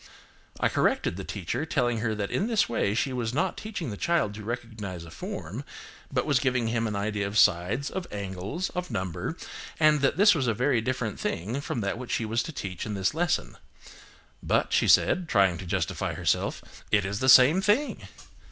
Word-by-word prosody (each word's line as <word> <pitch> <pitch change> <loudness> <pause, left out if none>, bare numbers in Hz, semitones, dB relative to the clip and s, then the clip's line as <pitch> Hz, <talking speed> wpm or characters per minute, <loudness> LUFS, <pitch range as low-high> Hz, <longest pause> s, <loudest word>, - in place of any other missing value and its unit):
I - - +3
corrected - - +1
the 95 - -6
teacher, 95 - -3
telling 125 -7 0
her 110 -1 -1
that 100 -1 -3
in 200 - 0
this 225 -3 +2
way 105 -3 0
she 120 +4 0
was 120 -1 -2
not 185 +4 0
teaching 200 - -5
the 100 - -6
child 170 -10 +1
to 105 0 -8
recognise 110 -6 -5
a 80 - -12
form, - - -6 0.5
but - - 0
was 140 -4 +3
giving 125 -4 0
him 115 0 0
an 105 - -3
idea 100 0 -1
of 100 +2 -3
sides, 100 +9 +3
of 185 -2 -4
angles, 100 - -4
of 180 -1 -4
number, 95 -3 -3 0.4
and 155 -2 +4
that 140 - +2
this 205 +2 +7
was 140 -7 0
a 115 - +1
very 125 0 +2
different 125 -3 -2
thing 110 +11 -2
from 120 - -3
that 100 +3 -2
which 125 - -5
she 115 - 0
was 115 +2 0
to 165 - -5
teach 95 - -5
in 105 - -4
this 95 +4 0
lesson. 175 +2 -1 0.8
"But," - - +1
she - - +3
said, 180 -3 +4
trying 95 -5 +3
to 95 - -7
justify - - -2
herself, - - -2
"it 105 -2 +3
is 100 +1 -3
the 130 - +2
same 130 +8 +8
thing." 210 +9 +1
115 Hz, 200 wpm, -27 LUFS, 100-145 Hz, 0.8 s, same